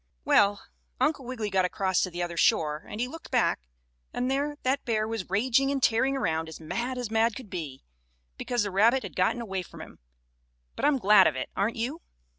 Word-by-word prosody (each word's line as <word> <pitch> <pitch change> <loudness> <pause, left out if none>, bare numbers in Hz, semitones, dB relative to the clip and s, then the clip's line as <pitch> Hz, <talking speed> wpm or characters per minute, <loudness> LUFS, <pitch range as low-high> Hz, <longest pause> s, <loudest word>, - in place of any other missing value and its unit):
Well, 205 0 +3 0.4
Uncle 300 -4 +1
Wiggily 225 -5 -4
got 190 -1 +2
across 185 0 0
to 185 - 0
the 175 0 -4
other 175 -1 -4
shore, 155 -2 +1
and 210 - -6
he 245 - 0
looked 325 +5 -10
back - - +2 0.5
and 250 +1 -1
there 290 +2 -1
that 265 +2 0
bear 215 -2 0
was 225 -5 -4
raging 250 +7 +2
and 280 - 0
tearing 260 +4 +2
around 160 -9 -1
as 160 - -9
mad 235 +11 -3
as 245 -3 -4
mad 225 0 +2
could 230 -5 -10
be, 150 -7 -6 0.5
because 240 - -1
the 205 - -3
rabbit 230 +7 +3
had - - -8
gotten 185 +6 +1
away 195 -4 -3
from 180 - -12
him. - - -11 0.8
But - - -2
I'm 295 -2 +4
glad 210 -4 +6
of - - 0
it; - - -5
aren't 215 +3 0
you? 260 +9 -3
220 Hz, 210 wpm, -27 LUFS, 185-255 Hz, 0.8 s, glad